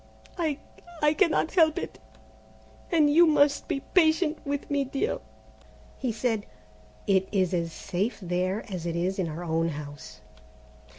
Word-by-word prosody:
I 315 -5 -1 0.5
I 295 0 +5
cannot 330 -2 +2
help 320 -4 +4
it, - - -5 0.9
and 315 -3 +5
you 330 +4 +6
must 290 -2 +3
be 275 - -2
patient 320 -2 +3
with 285 0 -3
me, 285 -1 +2
dear." 275 - -2 0.8
He 255 -3 -1
said, 220 -1 -1 0.6
"It 190 -1 +2
is 190 -3 +1
as 170 -2 -1
safe 195 +8 -3
there 185 +2 -1
as 180 -4 -5
it 170 - -2
is 185 +3 -1
in 180 - 0
our 160 +3 -6
own 165 0 0
house." 145 -3 -8
225 Hz, 150 wpm, -27 LUFS, -, 0.9 s, you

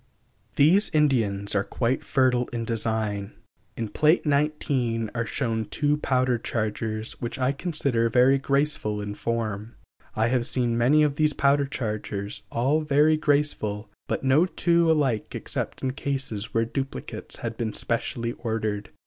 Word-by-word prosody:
These 175 +9 +5
Indians 110 -10 +2
are 100 -1 +2
quite 120 +4 -1
fertile 125 -3 +2
in 115 -1 -4
design. 110 -3 -2 0.4
In 115 -2 -3
Pl. 155 +7 +4
XIX 140 -6 0
are 115 -1 -2
shown 115 -2 -1
two 145 +6 +1
powder 130 -4 +1
chargers, 110 0 -3
which 120 +3 -4
I 130 0 +1
consider 140 -7 0
very 130 +4 +4
graceful 140 -7 0
in 105 0 -4
form. 110 -1 -3 0.4
I 110 +2 +2
have 125 -1 +1
seen 120 -2 0
many 135 +6 +4
of 145 -1 0
these 155 -1 +2
powder 140 0 +2
chargers, 105 -5 -4
all 135 +7 +1
very 150 +1 +4
graceful, 140 -9 0 0.2
but - - -2
no 140 +7 +4
two 170 -2 +2
alike 135 -9 0
except - - -4
in 130 - 0
cases 135 -6 -3
where 115 0 +1
duplicates 135 +3 -5
had 115 -1 -3
been 110 -1 -2
specially 115 0 -2
ordered. 110 -3 -2
120 Hz, 145 wpm, -25 LUFS, 110-140 Hz, 0.4 s, These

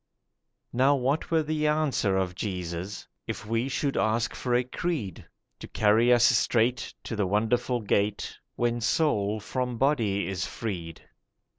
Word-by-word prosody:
Now 135 +4 +4
what 135 +3 0
were 160 -1 +2
the 155 0 0
answer 150 -10 +1
of 95 -2 -1
Jesus 90 0 -5 0.2
If - - -5
we 115 +4 -1
should 140 +1 -1
ask 115 +2 +1
for 125 -1 -1
a 125 - +3
creed, 130 - -3 0.4
To - - -8
carry 110 +3 +3
us 120 -1 +5
straight 120 +1 +2
to 115 - -4
the 105 -3 0
wonderful 120 +4 +1
gate 100 0 0 0.2
When 120 0 0
soul 110 -6 +1
from 125 +3 -3
body 115 -7 +1
is 95 -1 -2
freed? 85 -8 -5
115 Hz, 145 wpm, -27 LUFS, 100-130 Hz, 0.4 s, us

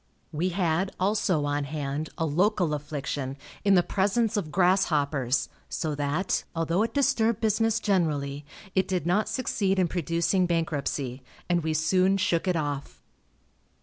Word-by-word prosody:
We 170 +4 0
had, 180 0 0
also, 185 -5 +1
on 145 0 -1
hand 145 +1 -3
a 165 - 0
local 175 +1 +1
affliction, 145 -2 -4 0.3
in 200 -1 +5
the 175 - +5
presence 205 +5 +1
of 180 -7 -2
grasshoppers, 150 -8 +2 0.2
so 155 -2 -2
that, 145 +6 -1
although 165 +3 +1
it 230 - -1
disturbed 240 -6 +2
business 225 +1 +2
generally, 150 -9 0 0.3
it 190 -1 +2
did 180 -4 -1
not 205 +5 +1
succeed 215 -4 0
in 185 -2 +3
producing 170 +2 +1
bankruptcy, 145 -6 -2 0.3
and 175 -1 +2
we 160 0 -1
soon 185 +5 +3
shook 175 -1 0
it 180 - +2
off. 145 -3 -3
170 Hz, 145 wpm, -27 LUFS, 150-195 Hz, 0.3 s, in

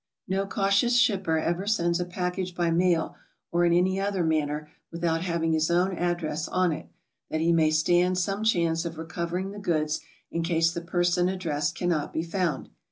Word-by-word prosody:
No 195 +1 -1
cautious 200 +5 +2
shipper 195 -9 +2
ever 175 +5 -1
sends 175 -5 +1
a 175 - -1
package 180 0 -3
by 170 -1 +1
mail 170 -1 +1 0.4
or 175 0 +3
in 170 - +3
any 185 +2 +2
other 195 -2 0
manner 150 -1 0 0.2
without 165 -1 -1
having 170 -2 0
his 160 0 +1
own 180 +2 +2
ad 175 0 0
dress 155 -1 -3
on 185 -1 +1
it, 155 - -6 0.4
that 155 - -1
he 165 +1 +2
may 160 -2 +4
stand 175 +4 +2
some 195 +3 -1
chance 170 -6 +2
of 165 -2 -5
recovering 170 +3 -3
the 205 - -8
goods 155 -5 0 0.3
in 170 - -1
case 165 -1 +2
the 170 - -4
person 175 +1 +1
addressed 160 -4 -2
cannot 170 -4 -1
be 160 - -1
found. 175 -1 -2
175 Hz, 185 wpm, -27 LUFS, 165-185 Hz, 0.4 s, may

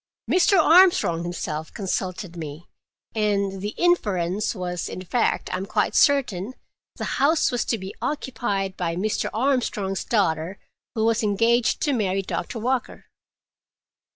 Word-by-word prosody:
Mr. 370 +2 +4
Armstrong 340 - +5
himself 160 -3 -4
consulted 185 -2 -3
me, 155 0 -7 0.5
and 200 -3 0
the 205 +1 -4
inference 210 - +1
was—in 180 0 -4
fact, 235 +6 0
I - - 0
am 190 +2 -5
quite - - 0
certain—the 255 -6 0 0.2
house 305 +2 +3
was 245 - 0
to 230 - 0
be 190 -1 -7
occupied 215 -9 -2
by 170 -2 -2
Mr. 210 +4 -1
Armstrong's 220 -6 0
daughter, 185 -4 0 0.4
who 220 -1 +1
was 230 0 +2
engaged 230 +3 +2
to 290 - +1
marry 195 -5 0
Doctor 230 - -4
Walker." 250 +3 -2
205 Hz, 125 wpm, -24 LUFS, 185-245 Hz, 0.5 s, Armstrong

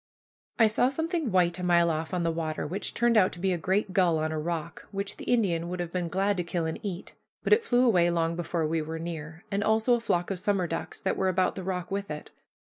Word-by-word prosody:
I 225 - +6
saw 220 +4 +3
something 320 - -2
white 180 -1 +2
a - - -4
mile 170 -1 +4
off 160 0 -3
on 180 -2 -1
the 165 - +1
water, 160 -1 -3
which 185 +7 -3
turned 235 -1 +3
out 185 -3 +5
to 175 - -9
be 190 +1 +1
a - - -1
great 190 +3 0
gull 180 -4 +3
on 155 0 -1
a 155 - -2
rock, 165 0 -4
which 200 0 -3
the - - -8
Indian 175 -8 +1
would 180 0 -4
have 175 -1 -3
been 180 -1 -2
glad 195 +3 0
to 180 - 0
kill 170 0 -2
and 160 - -3
eat. 195 -4 -6 0.3
But - - +4
it 445 +2 +4
flew 245 - +3
away 180 -7 +4
long 165 -1 0
before 170 -1 -1
we 160 +1 0
were 160 +1 -5
near; 160 -1 -6
and 200 +1 0
also 220 +3 +3
a 240 - +3
flock 175 -5 0
of 190 - -2
summer 195 -1 +1
ducks 165 0 -4
that 190 - -1
were 190 - +2
about 185 0 +2
the 190 - -6
rock 180 -1 -3
with 200 0 -2
it. 150 0 -7
180 Hz, 260 wpm, -28 LUFS, 165-200 Hz, 0.3 s, I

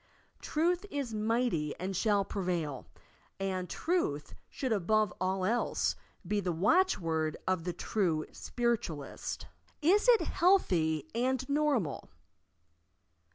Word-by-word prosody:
"Truth 350 +5 0
is 275 - -3
mighty 215 -8 0
and 190 +2 -3
shall 205 0 +2
prevail," 170 - -3 0.5
and 185 -2 -2
Truth 310 - -1 0.2
should 260 -4 -1
above 215 0 +2
all 185 0 0
else 235 +5 +1 0.3
be 205 +4 0
the 185 -3 -1
watch 340 - +3
word 160 -2 -1
of 185 -3 0
the 180 - -2
true 170 -4 0
Spiritualist, 235 - -3 0.3
IS 390 +9 +3
IT 470 -2 +7
HEALTHY 165 - +2
AND 260 +2 0
NORMAL! 280 - 0
205 Hz, 110 wpm, -31 LUFS, 170-260 Hz, 0.5 s, IT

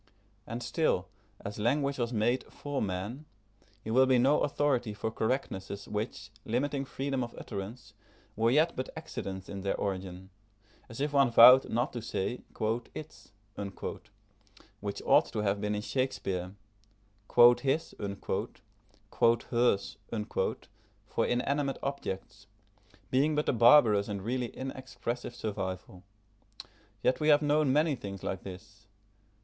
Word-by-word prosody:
And 120 +1 -5
still, 155 - 0 0.4
as 105 +1 -5
language 140 +5 +1
was 120 -1 -1
made 120 +3 +1
for 145 -1 -4
man, 105 +9 -4 0.6
he 110 - -4
will 130 +3 +5
be 130 -1 +4
no 135 +5 +4
authority 130 -7 0
for 110 +1 -3
correctnesses 100 -5 -3
which, 105 -1 -4
limiting 140 +4 -1
freedom 135 -1 -2
of 120 - -7
utterance, 100 +1 -7 0.4
were 115 +2 +2
yet 155 +7 +3
but 130 - -4
accidents 95 -1 -6
in 100 -1 -6
their 100 - -1
origin; 95 -1 -4 0.6
as 115 - -9
if 145 0 -1
one 140 -2 +5
vowed 125 +3 +8
not 120 +2 0
to 120 - -4
say 115 +1 -3 0.5
"its," 155 -6 -10 1.5
which 100 -2 -4
ought - - +6
to - - -5
have 100 -1 0
been 105 0 -1
in 105 - -3
Shakespeare; 95 -9 -2 1.1
"his" 140 +4 0 1.6
"hers," 115 -5 +1 1.1
for 115 - 0
inanimate 140 +3 0
objects, 105 -6 -5 0.6
being 145 +4 +3
but 150 - 0
a - - +3
barbarous 115 -4 +6
and 100 -2 -4
really 125 +2 -1
inexpressive 130 -2 -5
survival. 95 -5 -5 1.0
Yet 125 - +2
we 155 - 0
have 150 0 +6
known 150 -1 +3
many 150 +1 +3
things 100 -5 -8
like 95 - -3
this. 100 +2 -11
120 Hz, 130 wpm, -30 LUFS, 100-135 Hz, 1.6 s, vowed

